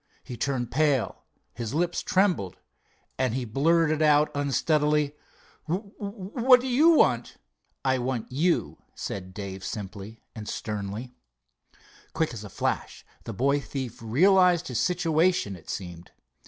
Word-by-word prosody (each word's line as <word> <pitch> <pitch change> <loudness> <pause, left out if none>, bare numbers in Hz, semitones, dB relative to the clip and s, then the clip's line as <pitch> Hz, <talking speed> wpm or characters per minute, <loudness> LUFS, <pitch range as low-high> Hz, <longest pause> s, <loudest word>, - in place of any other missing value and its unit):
He 125 - -7
turned 120 -1 -2
pale, 140 -3 +1 0.3
his 120 +2 -5
lips 175 +2 0
trembled, 180 - +1 0.6
and 130 -3 +1
he 130 -2 -2
blurted 155 +6 +2
out 150 0 +4
unsteadily: 150 +1 +1 0.5
"W—what 205 - +1
do 255 - -4
you 275 +6 +5
want?" - - +2 0.5
"I 130 -1 +2
want 125 -2 -3
you," 135 - 0 0.2
said 95 -2 -5
Dave 95 -1 -7
simply 105 +2 -7
and 110 -3 -7
sternly. 105 +4 -5 1.0
Quick 160 -4 0
as 110 -2 -7
a 105 - -8
flash - - -3 0.2
the - - -5
boy 140 +3 +2
thief 130 -5 -6
realized 180 - +4
his 125 - -1
situation, 170 - +1
it 85 - -15
seemed. 90 -2 -6
140 Hz, 130 wpm, -26 LUFS, 110-170 Hz, 1.0 s, you